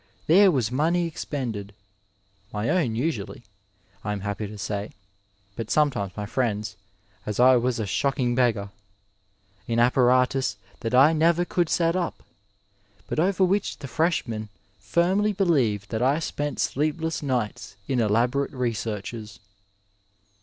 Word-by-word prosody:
there 195 +5 +6
was 125 - 0
money 165 +6 +1
expended 115 -11 -5 0.8
(my 105 +2 -2
own 135 -12 +1
usually, 120 -4 -3 0.6
I 105 - -2
am 100 - -5
happy 105 +1 -3
to 105 +1 -9
say, 100 +1 -4 0.6
but 115 -1 -5
sometimes 125 -12 +1
my 105 - -3
friends', 110 -2 -2 0.5
as 105 0 -4
I 130 +1 +7
was 125 0 0
a 110 - -1
shock 140 +8 -1
ing 120 -2 +1
beggar 115 -5 +1 0.5
!) 100 0 -38
in 115 - -1
apparatus 125 +1 +3 0.2
that 115 +2 -1
I 140 +5 +7
never 170 +2 +3
could 175 -2 0
set 170 0 +2
up, 180 -2 -3 0.8
but - - -3
over 190 +3 +2
which 195 +2 +1
the 140 - -8
freshmen 125 -9 -1 0.3
firmly 180 - +1
believed 135 - +1
that 110 0 -1
I 135 +4 +3
spent 145 -2 -3
sleep 150 +3 0
less 160 0 -2
nights 125 -8 -3
in 130 -2 0
elaborate 120 +6 +1
researches. 110 -3 -4
125 Hz, 140 wpm, -25 LUFS, 105-155 Hz, 0.8 s, I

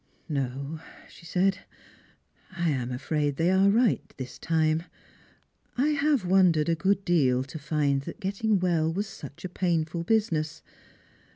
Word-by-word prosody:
"No," 140 +2 -3 0.3
she 170 - -15
said, 185 +2 +1 1.0
"lam 140 -8 0
afraid 145 +3 -1
they 165 +5 +2
are 190 +1 +4
right 230 +2 +3 0.2
this 130 -1 -7
time; 160 -1 +1 1.0
J 295 +4 +2
have 285 -7 +1
wondered 175 -4 +4
a - - +3
good 190 +4 0
deal 130 -7 +3
to 140 +4 -8
find 145 -2 0
that - - -9
getting 200 +1 0
well 165 -3 +1
was 200 +5 -2
such 175 -4 -10
a - - -1
painful 170 -2 -1
business. 170 -7 0
165 Hz, 135 wpm, -27 LUFS, 150-195 Hz, 1.0 s, are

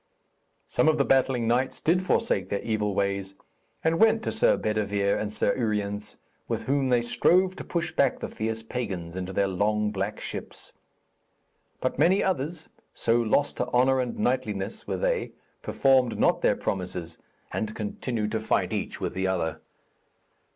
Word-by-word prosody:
Some - - +2
of 155 - +4
the 140 - +2
battling 130 -3 +2
knights 125 +3 +1
did 175 +3 +2
forsake 95 - 0
their 100 - -2
evil 105 -3 -1
ways, 100 -1 -1 0.5
and 160 +1 +2
went 225 0 +4
to - - -1
Sir 220 - +3
Bedevere 100 -2 0
and 105 -1 -3
Sir 105 - +1
Uriens, 105 -3 -2 0.3
with - - -2
whom 135 -1 +1
they 120 -1 +3
strove 185 +9 +3
to - - -6
push 170 -1 -2
back 140 -5 +2
the - - -4
fierce 110 +1 -3
pagans 95 -8 -4
into 95 0 -4
their 100 +1 +1
long 105 +2 +1
black 105 +1 -3
ships. - - -7 1.1
But - - -1
many 190 +4 +4
others, 160 -2 -2 0.3
so 115 - +1
lost 120 +5 +1
to - - -1
honour 130 +2 +3
and 125 -1 -2
knightliness 110 -5 -2
were - - -1
they, - - -1 0.3
performed 130 -3 +2
not - - +3
their - - +3
promises, 90 -3 -4 0.3
and 110 0 -3
continued 110 0 -3
to 110 - 0
fight 110 - 0
each - - -3
with - - -3
the 95 0 -1
other. 85 -4 -1
110 Hz, 165 wpm, -27 LUFS, 100-135 Hz, 1.1 s, of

